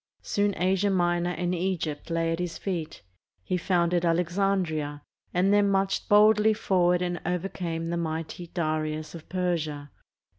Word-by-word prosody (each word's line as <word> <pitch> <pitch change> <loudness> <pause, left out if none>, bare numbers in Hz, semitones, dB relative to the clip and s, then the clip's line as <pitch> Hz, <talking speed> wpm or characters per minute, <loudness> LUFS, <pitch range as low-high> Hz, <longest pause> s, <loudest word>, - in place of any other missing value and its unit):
Soon 205 -1 0
Asia 190 +2 +2
Minor 175 -2 +1
and 180 0 -1
Egypt 175 -4 -2
lay 165 0 0
at 165 - -2
his 175 -2 -3
feet. 170 -5 -4 0.4
He 180 - -1
founded 175 -1 +1
Alexandria, 170 -4 0 0.3
and 185 +3 +2
then 205 -1 +4
marched 195 0 0
boldly 215 +1 +5
forward 180 -3 +2
and 175 0 -3
overcame 170 -2 -3
the 170 - -1
mighty 165 +1 -4
Darius 155 -2 -2
of 165 -2 -11
Persia. 160 -6 -2
175 Hz, 140 wpm, -27 LUFS, 165-190 Hz, 0.4 s, boldly